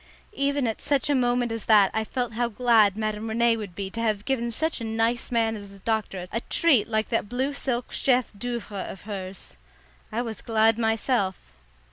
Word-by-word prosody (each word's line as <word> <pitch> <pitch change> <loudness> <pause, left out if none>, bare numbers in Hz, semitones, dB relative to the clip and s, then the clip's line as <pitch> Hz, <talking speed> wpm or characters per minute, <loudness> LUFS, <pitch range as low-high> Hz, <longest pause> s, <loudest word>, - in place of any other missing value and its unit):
Even 280 -4 0
at 225 -2 -2
such 285 -1 +1
a - - +4
moment 245 -2 +1
as 225 -1 -4
that 210 -3 +6
I 220 - 0
felt 245 +1 -3
how 240 +2 0
glad 220 -3 +3
Madame 215 0 -2
Rene 230 +1 +3
would 210 -2 -5
have 175 - -23
been 195 0 -5
to 230 - -4
have 215 -2 0
given 245 -3 0
such 315 +4 -1
a - - -3
nice 225 +2 0
man 225 -2 +1
as 200 -2 -9
the 200 - -13
doctor 195 -3 -2
a 230 - -1
treat 280 -8 +3
like 220 -1 0
that 225 -3 -1
blue 260 +4 -1
silk 250 -3 -2
chef 250 -3 +2
d'oeuvre 230 -3 -4
of 190 - -9
hers. 190 - -7 0.5
I 235 +3 -1
was 225 -2 -6
glad 225 0 +3
myself. 225 -3 0
225 Hz, 200 wpm, -26 LUFS, 210-245 Hz, 0.5 s, that